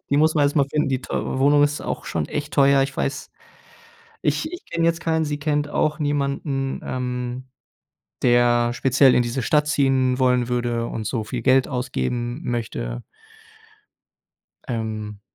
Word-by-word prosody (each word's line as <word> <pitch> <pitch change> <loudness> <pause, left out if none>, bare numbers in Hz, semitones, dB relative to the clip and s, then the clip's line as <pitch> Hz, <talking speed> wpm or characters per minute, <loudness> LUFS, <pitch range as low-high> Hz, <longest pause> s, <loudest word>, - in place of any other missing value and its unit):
die 140 - +3
muss 155 +2 +3
man 150 - +3
erst 145 +2 0
mal 140 - +5
finden. 150 -1 +1
Die 130 -1 -1
teure 130 - -3
Wohnung 145 +2 +4
ist 145 +1 +1
auch - - -4
schon 80 -3 -2
echt 150 0 -4
teuer, 140 -1 +5
ich 135 0 -4
weiß. 140 0 -3 0.9
Ich 310 - -1
ich 355 +1 -9
kenne 165 0 -1
jetzt 170 0 +1
keinen. 160 -1 0
Sie 145 -1 -2
kennt 150 -1 0
auch 155 +2 0
niemanden, 140 -2 -1
ähm, 125 0 -4 0.8
der 120 -1 +3
speziell 130 +1 +4
in 125 - +4
diese 120 +2 -3
Stadt 150 +4 +2
ziehen 135 -3 +2
wollen 125 -1 +2
würde 120 -1 -1
und 110 -3 -5
so 110 -1 -2
viel 120 +2 -5
Geld 130 0 +4
ausgeben 120 - -3
möchte. - - -3 1.7
Ähm, 110 -3 -4
130 Hz, 160 wpm, -22 LUFS, 120-145 Hz, 1.7 s, mal